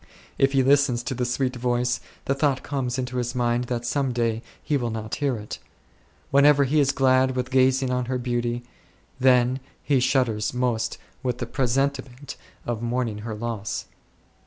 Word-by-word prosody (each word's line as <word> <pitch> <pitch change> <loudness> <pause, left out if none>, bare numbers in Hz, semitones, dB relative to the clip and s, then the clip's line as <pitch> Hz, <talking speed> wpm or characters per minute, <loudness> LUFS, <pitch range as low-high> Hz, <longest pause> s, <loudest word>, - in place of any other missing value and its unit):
If 135 0 +3
he 135 -1 +4
listens 135 -3 +3
to 130 - -3
the 125 0 -1
sweet 125 +1 -1
voice, 125 0 0 0.3
the 135 - +1
thought 135 -1 +1
comes 130 -3 -2
into 125 -1 -3
his 125 +1 -2
mind 120 0 +1
that 120 -1 -3
some 135 +1 0
day 115 -2 0 0.2
he 150 - 0
will 120 -4 0
not 110 -1 -5
hear 140 -5 0
it. 105 0 -7 0.7
Whenever 140 +1 +6
he 145 +3 +2
is 140 -1 +4
glad 130 -1 +3
with 125 0 -2
gazing 130 0 +3
on 125 0 0
her 130 +1 -1
beauty, 120 -1 -2 0.6
then 125 0 +4 0.2
he 140 -3 +2
shudders 125 -4 +1
most 125 -3 0 0.2
with 125 -2 -1
the 120 - -3
presentiment 135 +1 -1 0.3
of 120 -2 -3
mourning 120 -2 -1
her 110 0 -5
loss. 110 -2 -4
125 Hz, 170 wpm, -25 LUFS, 120-135 Hz, 0.7 s, Whenever